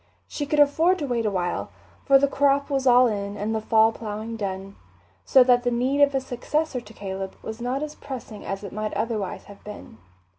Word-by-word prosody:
She 290 Hz, -, -4 dB
could 300 Hz, +1 st, +1 dB
afford 320 Hz, +6 st, +4 dB
to 300 Hz, -, -3 dB
wait 235 Hz, -4 st, -1 dB
a -, -, +2 dB
while, 180 Hz, -3 st, -2 dB, 0.4 s
for 275 Hz, -1 st, +7 dB
the 280 Hz, +1 st, +3 dB
crop 280 Hz, +1 st, +1 dB
was 270 Hz, -1 st, 0 dB
all 250 Hz, 0 st, +7 dB
in 205 Hz, -3 st, -2 dB
and 210 Hz, +2 st, -2 dB
the 220 Hz, -, -1 dB
fall 220 Hz, +1 st, +4 dB
ploughing 220 Hz, 0 st, -6 dB
done, 195 Hz, -2 st, -5 dB, 0.5 s
so 260 Hz, -, +6 dB
that 245 Hz, -1 st, +4 dB
the 245 Hz, -, 0 dB
need 255 Hz, +4 st, 0 dB
of 285 Hz, -1 st, +4 dB
a -, -, +3 dB
successor 265 Hz, +2 st, -2 dB
to 215 Hz, -1 st, -15 dB
Caleb 190 Hz, -1 st, -5 dB
was 220 Hz, +2 st, -7 dB
not 255 Hz, +4 st, -2 dB
as 305 Hz, 0 st, -5 dB
pressing 250 Hz, -8 st, -8 dB
as 195 Hz, +1 st, -5 dB
it 200 Hz, -, -7 dB
might 215 Hz, 0 st, -3 dB
otherwise 215 Hz, -2 st, -3 dB
have 200 Hz, -1 st, -15 dB
been. 205 Hz, -, -10 dB
235 Hz, 215 wpm, -24 LUFS, 210-275 Hz, 0.5 s, for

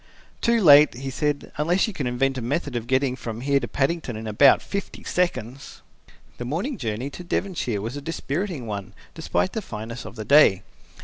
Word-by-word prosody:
"Too 235 Hz, 0 st, +3 dB
late," 150 Hz, -3 st, +8 dB
he 135 Hz, +2 st, -5 dB
said, 145 Hz, +2 st, -2 dB
"unless 170 Hz, +6 st, +2 dB
you 220 Hz, -, -5 dB
can 140 Hz, -8 st, -3 dB
invent 135 Hz, +2 st, 0 dB
a -, -, -6 dB
method 140 Hz, +3 st, -2 dB
of 120 Hz, -1 st, -3 dB
getting 130 Hz, 0 st, +1 dB
from 115 Hz, -2 st, -6 dB
here 140 Hz, +1 st, +2 dB
to -, -, -4 dB
Paddington 140 Hz, -3 st, -1 dB
in 110 Hz, -, -7 dB
about 110 Hz, +6 st, +5 dB
fifty 200 Hz, 0 st, -5 dB
seconds." 140 Hz, -8 st, -3 dB, 0.6 s
The -, -, -3 dB
morning 180 Hz, -, -3 dB
journey 115 Hz, +4 st, -3 dB
to 180 Hz, -, -9 dB
Devonshire 170 Hz, -, -2 dB
was 115 Hz, +5 st, -4 dB
a 145 Hz, -, -5 dB
dispiriting 165 Hz, -1 st, -3 dB
one 100 Hz, -3 st, -6 dB, 0.2 s
despite 90 Hz, +1 st, -1 dB
the 220 Hz, -, -2 dB
fineness 115 Hz, -, -7 dB
of -, -, -10 dB
the 110 Hz, -2 st, -6 dB
day. 135 Hz, -10 st, +6 dB
135 Hz, 190 wpm, -24 LUFS, 120-165 Hz, 0.6 s, late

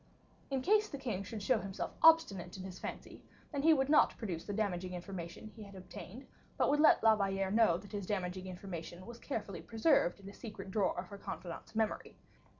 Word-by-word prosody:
In 265 Hz, -2 st, -1 dB
case 425 Hz, +4 st, +4 dB
the 280 Hz, -, -5 dB
king 240 Hz, -8 st, -3 dB
should 210 Hz, +1 st, -6 dB
show 250 Hz, +1 st, +3 dB
himself 195 Hz, -1 st, -4 dB
obstinate 200 Hz, -, +5 dB
in 185 Hz, -, -7 dB
his 185 Hz, -1 st, -8 dB
fancy, -, -, -7 dB, 0.3 s
then 285 Hz, -3 st, -1 dB
he 320 Hz, +3 st, +6 dB
would 270 Hz, -4 st, +3 dB
not 300 Hz, +1 st, +5 dB
produce 180 Hz, -8 st, -4 dB
the -, -, -4 dB
damaging 185 Hz, -3 st, -2 dB
information 175 Hz, +1 st, -7 dB
he 225 Hz, -, -11 dB
had 200 Hz, -1 st, -10 dB
obtained, 190 Hz, +6 st, -9 dB, 0.3 s
but -, -, +3 dB
would 295 Hz, -, +2 dB
let 305 Hz, -, +6 dB
La 220 Hz, -1 st, +7 dB
Valliere 195 Hz, -2 st, 0 dB
know 215 Hz, -6 st, +4 dB
that 195 Hz, +2 st, -12 dB
this 200 Hz, -3 st, -4 dB
damaging 185 Hz, -2 st, -2 dB
information 180 Hz, -1 st, -7 dB
was 235 Hz, 0 st, -9 dB
carefully 210 Hz, -8 st, -4 dB
preserved 225 Hz, -, +2 dB
in 195 Hz, -, -12 dB
a 200 Hz, -, -8 dB
secret 210 Hz, -4 st, -8 dB
drawer 200 Hz, -2 st, +1 dB
of 180 Hz, -, -3 dB
her 200 Hz, -, -9 dB
confidant's 175 Hz, +2 st, -7 dB
memory. 220 Hz, -1 st, -1 dB
200 Hz, 205 wpm, -34 LUFS, 185-235 Hz, 0.3 s, La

